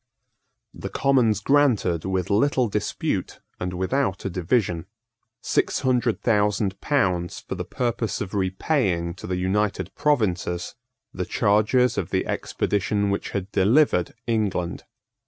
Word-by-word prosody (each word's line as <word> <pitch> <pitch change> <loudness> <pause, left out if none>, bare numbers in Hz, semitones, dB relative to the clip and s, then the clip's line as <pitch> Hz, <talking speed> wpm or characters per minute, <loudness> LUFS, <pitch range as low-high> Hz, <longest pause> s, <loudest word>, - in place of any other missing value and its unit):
The - - -6
Commons 125 -6 +2
granted, 120 - +2
with 95 -1 -1
little 125 +4 +3
dispute, 105 - -2 0.2
and 90 0 -3
without 95 +3 -1
a 95 - -1
division, 90 -1 0 0.6
six - - +1
hundred 125 -3 +1
thousand 105 -3 +1
pounds 90 -12 0
for - - -6
the - - -4
purpose 120 -2 -2
of 100 -1 -5
repaying 95 - 0
to - - -8
the 90 0 -1
United 95 0 -1
Provinces 100 - 0 0.4
the 90 - -3
charges 110 +6 +2
of - - -4
the - - 0
expedition 100 0 -1
which 100 - -2
had 100 0 -4
delivered 105 - +3
England. 105 -6 -1
100 Hz, 125 wpm, -24 LUFS, 90-120 Hz, 0.6 s, little